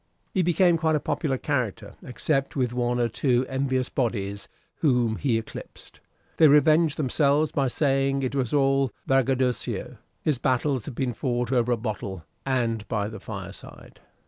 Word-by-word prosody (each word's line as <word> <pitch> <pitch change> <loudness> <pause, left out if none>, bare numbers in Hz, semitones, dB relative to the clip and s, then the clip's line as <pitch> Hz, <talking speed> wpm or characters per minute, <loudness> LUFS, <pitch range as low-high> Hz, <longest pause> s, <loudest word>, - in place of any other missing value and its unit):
He 190 - +2
became 175 0 +3
quite 160 -1 +1
a - - +2
popular 140 -2 -1
character, 120 -8 -2
except 135 +1 -2
with 125 -3 0
one 120 0 0
or 120 - +2
two 125 +2 +1
envious 130 -1 0
bodies, 100 -6 -2 0.3
whom 125 -7 +2
he 125 -5 +1
eclipsed; 115 - -9 0.4
they 160 - +7
revenged 155 +2 +4
themselves 145 +2 +2
by 140 -2 +1
saying 135 0 +1
it 130 - -2
was 130 -4 -1
all 135 -2 +2
braggadocio: 130 -2 0 0.3
his 150 -6 +1
battles 130 -1 0
had 140 - -7
been 125 -2 -1
fought 120 0 -2
over 125 -2 +2
a 120 - +2
bottle, 100 -6 -5 0.2
and 115 -5 0
by 105 -3 -1
the 110 - -8
fireside. - - -10
130 Hz, 155 wpm, -25 LUFS, 120-140 Hz, 0.4 s, they